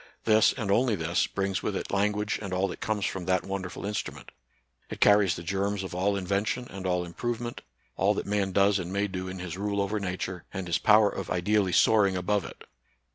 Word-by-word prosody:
This, 110 -1 +5
and 110 -6 -3
only 115 +1 +3
this, 85 -1 0
brings 95 -1 -2
with - - -2
it - - -4
language 105 +1 0
and 100 -3 -5
all 95 +1 +1
that - - -7
comes 105 -2 -1
from 95 -2 -3
that 95 0 +1
wonderful 95 -1 -5
instrument; 105 0 -5 0.6
it - - -7
carries 100 -4 +5
the 85 - -7
germs. 100 +3 -1
of 95 - -6
all 95 +3 +1
invention 100 +6 -1
and 95 -1 -5
all 90 -1 0
improvement, 120 +6 -4 0.4
all - - +2
that - - -3
man 100 -1 0
does 100 +1 +3
and 90 0 -5
may 100 +1 0
do 95 -1 -5
in 95 0 -6
his 90 0 -6
rule 100 0 -1
over 100 +2 0
Nature 95 -2 -4
and 95 -2 -4
his 85 -1 0
power 105 0 +6
of - - -6
ideally 95 +2 +1
soaring 100 -1 +4
above 100 +2 0
it. - - -10
100 Hz, 210 wpm, -28 LUFS, 95-105 Hz, 0.6 s, power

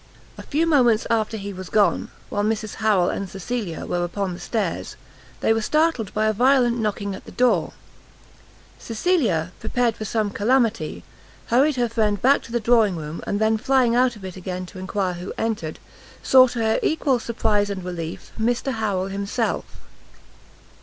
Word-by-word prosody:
A - - -9
few 315 +3 0
moments 245 -9 +3
after 220 -1 0
he 200 -1 -6
was 185 0 -8
gone, 205 -5 +2 0.2
while 205 - -1
Mrs 215 0 -2
Harrel 200 -5 +3
and 200 -1 -4
Cecilia 195 -2 -4
were 175 0 -1
upon 185 +1 -2
the 175 - -8
stairs, 210 -7 -3 0.5
they 225 - +3
were 225 - 0
startled 305 - +1
by 215 0 0
a 215 - +2
violent 245 +1 +3
knocking 205 -2 -2
at 190 - -9
the - - -11
door; 250 0 +2 1.1
Cecilia, 225 - 0
prepared 245 -3 0
for 215 - -6
some 215 -1 -1
calamity, 230 +2 0 0.5
hurried 270 +5 +3
her 245 -2 +1
friend 215 -3 0
back 270 +7 +4
to - - -12
the 240 - +1
drawing 225 -4 +3
room, 155 0 -6
and 205 - -1
then 220 0 +2
flying 260 -2 +3
out 250 -1 +3
of 200 -3 -10
it 185 - -7
again 185 0 -5
to 185 +1 -11
enquire 190 0 -2
who 180 +2 -6
entered, 210 -9 -2 0.5
saw 260 -1 +7
to 240 - -7
her 220 -1 +1
equal 285 -5 +1
surprize 210 -3 0
and 195 -2 -4
relief, 170 -2 -6
Mr 240 +4 0
Harrel 205 -5 -1
himself. 200 +4 -2
220 Hz, 175 wpm, -23 LUFS, 195-240 Hz, 1.1 s, saw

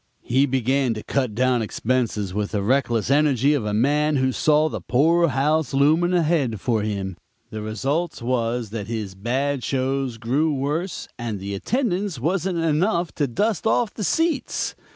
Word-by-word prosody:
"He 135 +3 +2
began 130 -1 +1
to 110 - -6
cut 130 -6 -1
down 125 0 +2
expenses 110 -3 -1
with 105 +1 -2
the 100 -2 0
reckless 120 -1 +1
energy 145 -1 +3
of 135 -7 -1
a 105 - -1
man 150 +6 +2
who 130 -1 +2
saw 155 +3 +3
the - - -5
poor 165 +6 +3
house 150 +1 +1
looming 160 +6 +3
ahead 150 - +1
for 115 +1 0
him; 100 -3 -3 0.3
the 110 -2 -5
results 135 - -2
was 120 -2 -1
that 105 -3 -5
his 110 -4 -4
bad 130 +7 -1
shows 135 -2 -1
grew 140 +7 0
worse, 150 +7 -2
and 115 -4 -3
the 100 +1 -5
attendance 200 - -1
wasn't 175 +5 -1
enough 170 +2 +1
to 145 - 0
dust 210 - 0
off 225 -1 +1
the 215 - -5
seats. 315 - 0
135 Hz, 165 wpm, -23 LUFS, 115-155 Hz, 0.3 s, energy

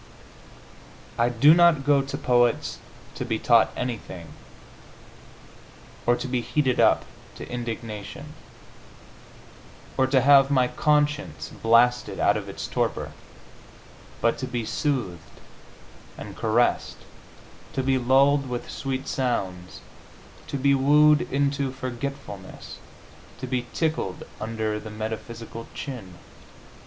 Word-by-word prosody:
I 120 +1 +2
do 135 +6 +6
not 170 -5 +4
go 145 -1 +4
to 135 - -5
poets 120 -1 +1 0.3
to - - -5
be - - -1
taught - - +4
anything, 110 -8 -5 1.8
or 120 - +5
to 130 - -5
be 125 -1 -1
heated 130 0 0
up - - +4 0.3
to - - -8
indignation, 115 -4 -6 1.6
or 130 - +3
to 130 -1 +3
have 135 0 +6
my 130 -3 +3
conscience 150 +2 0
blasted 120 +2 +2
out - - +3
of - - -4
its - - -6
torpor, - - -2 1.1
but 115 - +1
to 130 - -3
be 120 -3 -3
soothed 115 - -3 0.8
and - - -8
caressed, 115 +2 +1 0.8
to 135 - -1
be 130 0 +2
lulled 135 +2 +3
with 120 -1 -5
sweet 135 -1 -4
sounds, 95 -9 -3 0.7
to 140 - -3
be 140 +1 +3
wooed 150 +2 +4
into 140 -1 0
forgetfulness, 130 -6 -7 0.6
to 130 - -6
be 125 -1 -2
tickled 160 - -1 0.2
under 110 -1 -2
the 110 +1 -9
metaphysical 110 +2 -6
chin. 115 -11 -7
125 Hz, 115 wpm, -25 LUFS, 115-140 Hz, 1.8 s, do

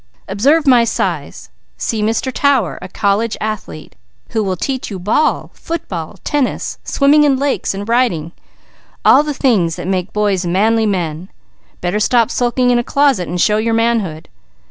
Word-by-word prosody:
"Observe 275 +11 +2
my 250 -4 +5
size. 230 - -3 0.3
See 220 -2 -2
Mr. 225 +4 -1
Tower, 270 - +1
a - - -7
college 205 +4 0
athlete, 210 - -6 0.3
who 220 -2 -1
will 190 -2 -1
teach 260 +8 -3
you 200 - -5
ball, 210 - 0
football, 195 - -6
tennis, 290 -3 -2
swimming 295 +2 +3
in 280 -3 +3
lakes 275 -7 -1
and 200 +2 -6
riding, 230 -10 +1 0.7
all - - +7
the 300 0 -3
things 195 - +1
that - - -7
make 185 0 -2
boys 205 -3 0
manly 215 +6 +2
men; 175 -2 -3 0.5
better 180 +4 -1
stop 235 +2 +2
sulking 245 0 +1
in 240 - +3
a - - -1
closet 275 -9 +1
and 175 +1 -3
show 210 +4 +3
your 225 +1 0
manhood. 225 -9 -1
220 Hz, 160 wpm, -16 LUFS, 185-255 Hz, 0.7 s, all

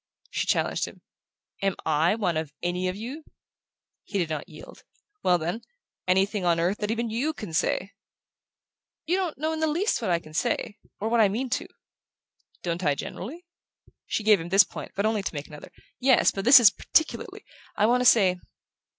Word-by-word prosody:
She - - -2
challenged - - +1
him: - - -12 0.6
"Am 195 -1 +1
I 160 +5 +2
one 185 -7 -1
of 155 -2 -3
'any 180 +1 -1
of 185 - -2
you'?" 250 +9 -7 0.8
He 200 - -4
did 170 -4 -1
not 155 +3 -4
yield. 155 -2 -13 0.4
"Well, 180 -1 +3
then 175 +7 -3 0.5
anything 190 +2 +2
on 170 -1 +2
earth 180 +5 0
that 210 - -2
even 230 0 -1
YOU 270 +8 -1
can 210 - -8
say." 190 +4 0 1.1
"You 345 - +1 0.2
don't 315 +2 -1
in 320 - -4
the 315 - +1
least 325 - 0
know 225 - -2
what 175 - +3
I - - +1
can 155 -2 -13
say 215 +2 -2 0.2
or 215 - -2
what 235 +1 +2
I 205 - +5
mean 245 +5 -3
to." - - -1 1.0
"Don't 175 +1 -2
I, 145 -3 +2
generally?" 285 - -7 0.6
She 220 - -2
gave 210 -4 +5
him 170 - -7
this 195 +3 +7
point, - - -9
but 200 - 0
only 215 -1 +1
to 195 - -5
make 145 0 -4
another. 150 -1 -12 0.3
"Yes; 260 0 +4
but 195 - -5
this 255 +1 +10
is 220 -5 +7
particularly. 320 +8 -1 0.3
I 210 - +2
want 245 +3 +3
to - - 0
say... 190 -7 +5
200 Hz, 195 wpm, -26 LUFS, 175-235 Hz, 1.1 s, this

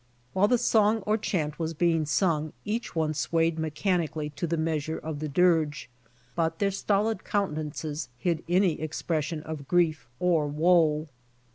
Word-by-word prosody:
While 195 +2 +4
the 245 - +3
song 220 -2 +3
or 210 - +2
chant 160 -8 -2
was 165 0 -2
being 165 -1 +2
sung 155 -1 +1
each 220 0 -3
one 155 -1 +1
sw^ayed 165 +2 0
mechanically 160 -1 -1
to 150 +4 -3
the 165 +1 -1
measure 160 0 -1
of 155 -2 -5
the 155 - -3
dirge, 155 -5 +2 0.4
but 165 -1 0
their 200 -1 +1
stolid 210 +3 0
countenances 155 -6 -2
hid 170 +3 -1
any 180 -3 +2
expression 155 0 -2
of 155 -3 -7
grief 165 -6 +1
or 170 -4 +2
woe. 155 0 +3
160 Hz, 150 wpm, -27 LUFS, 155-180 Hz, 0.4 s, While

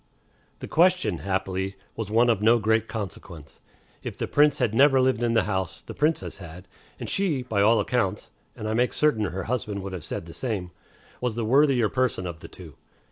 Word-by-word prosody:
The - - -5
question, 180 +3 +2
happily, 95 0 -2 0.2
was 110 -3 -4
one 115 +2 +4
of 105 -3 -1
no 115 +3 +5
great 110 0 +1
consequence. 95 -8 -8 0.4
If - - -6
the - - -2
Prince 145 0 +4
had 120 -5 0
never 135 +2 +5
lived 130 -3 +2
in 120 -1 +1
the 110 - +4
house, 95 -3 -2
the - - -10
Princess 150 - -1
had; 90 +1 -11 0.3
and - - -5
she, 170 -10 0
by 110 -5 0
all 110 +3 +5
accounts 105 -5 -1 0.2
(and 110 - -5
I 110 - -1
make 125 +2 +1
certain 125 -9 +2
her 95 +1 -4
husband 105 -5 -3
would 95 -1 -6
have 90 -4 -6
said 80 - -5
the 85 - -11
same), 95 -2 -3 0.5
was 125 -3 -1
the 115 -1 -2
worthier 130 -1 +4
person 125 -6 -1
of 85 -2 -6
the - - -10
two. - - -13
110 Hz, 200 wpm, -25 LUFS, 95-125 Hz, 0.5 s, no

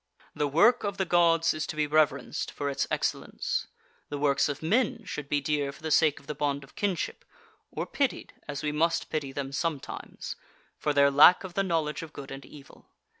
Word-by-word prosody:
The 150 - 0
work 170 - +4
of 200 -1 -2
the 190 - 0
Gods 165 -1 +3
is 155 0 -3
to - - -5
be 155 0 +1
reverenced 150 -3 +1
for 140 -1 -3
its 135 - -1
excellence. - - -2 0.4
The 145 - -3
works 140 0 +2
of 145 +2 -5
men 220 +8 +1
should 145 -1 -6
be 145 - +2
dear 145 -1 0
for 140 - -17
the 160 - -3
sake 155 -1 +4
of - - -20
the 150 - -4
bond 140 -1 -1
of 140 - -16
kinship, 195 -4 -2 0.5
or - - -4
pitied, 275 -3 -2
as 145 +1 -5
we 150 - 0
must 165 +3 0
pity 145 -3 -2
them 135 0 -4
sometimes, 150 0 -4 0.4
for 150 - -1
their 140 -1 +4
lack 150 +7 +7
of 185 -2 -7
the 195 - +1
knowledge 165 -5 -1
of 160 -2 -9
good 140 -1 -9
and 135 0 -7
evil. 145 -1 -15
150 Hz, 205 wpm, -28 LUFS, 140-165 Hz, 0.5 s, lack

